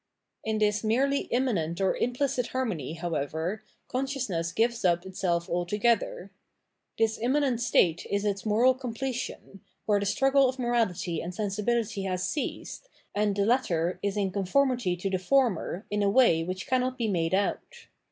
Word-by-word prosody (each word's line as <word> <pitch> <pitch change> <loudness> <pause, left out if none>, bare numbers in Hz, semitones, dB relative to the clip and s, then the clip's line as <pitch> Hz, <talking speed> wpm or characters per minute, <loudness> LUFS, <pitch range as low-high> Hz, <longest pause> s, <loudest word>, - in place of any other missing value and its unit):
In 220 0 -1
this 210 0 +1
merely 270 +6 +1
immanent 205 -10 0
or 190 -1 +2
implicit 250 0 0
harmony, 200 - -3
how 170 0 -4
ever, 160 +8 -2 0.3
consciousness 250 - -2
gives 230 +5 0
up 175 0 +2
itself 175 -2 -1
altogether. 200 +2 0 0.7
This 225 0 +1
im 245 +3 +1
manent 280 -5 +1
state 170 -7 +2
is 200 +1 0
its 200 -1 -1
moral 225 +4 +4
completion, 250 -5 -5 0.2
where 205 0 +3
the 200 - -1
struggle 270 +4 +3
of 260 - -5
morality 225 -9 0
and 175 +1 -6
sensibility 210 +1 -1
has 185 -1 -1
ceased, - - -4 0.2
and 205 -1 +1
the 200 0 +1
latter 185 -8 +1
is 200 0 -1
in 195 -2 0
conformity 215 +1 +1
to 185 - -3
the 185 - 0
former 220 -3 +1
in 210 0 0
a 200 - +3
way 200 -8 +4
which 185 +2 -4
cannot 255 0 0
be 235 -3 0
made 175 -3 +1
out. 200 +1 -2
210 Hz, 160 wpm, -28 LUFS, 185-245 Hz, 0.7 s, moral